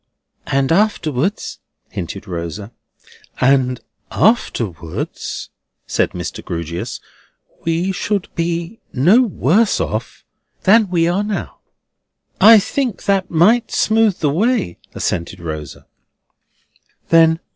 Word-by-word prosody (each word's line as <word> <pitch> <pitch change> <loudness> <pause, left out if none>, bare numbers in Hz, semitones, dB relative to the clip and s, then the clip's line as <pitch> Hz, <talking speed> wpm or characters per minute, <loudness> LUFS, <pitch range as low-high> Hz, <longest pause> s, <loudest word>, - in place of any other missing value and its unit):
"And 135 +1 +1
afterwards?" 190 - 0 0.3
hinted 95 +4 -6
Rosa. 90 +4 -5 0.7
"And 125 -1 +3 0.3
afterwards," 95 - -1 0.4
said - - 0
Mr. - - -6
Grewgious, 85 0 -5 0.7
"we 165 +3 0
should 200 0 -2
be 170 +4 -3
no 175 - +5
worse 215 - +2
off - - -4 0.4
than 210 +1 +5
we 170 -2 +2
are 180 +4 +1
now." 210 -1 -4 0.8
"I 220 +3 +9
think 240 +3 -1
that 195 -2 +1
might 205 +9 +3
smooth 220 -3 +2
the 150 -3 +2
way," 200 - 0 0.2
assented 85 +1 -3
Rosa. 75 -4 -7
170 Hz, 95 wpm, -18 LUFS, -, 0.8 s, I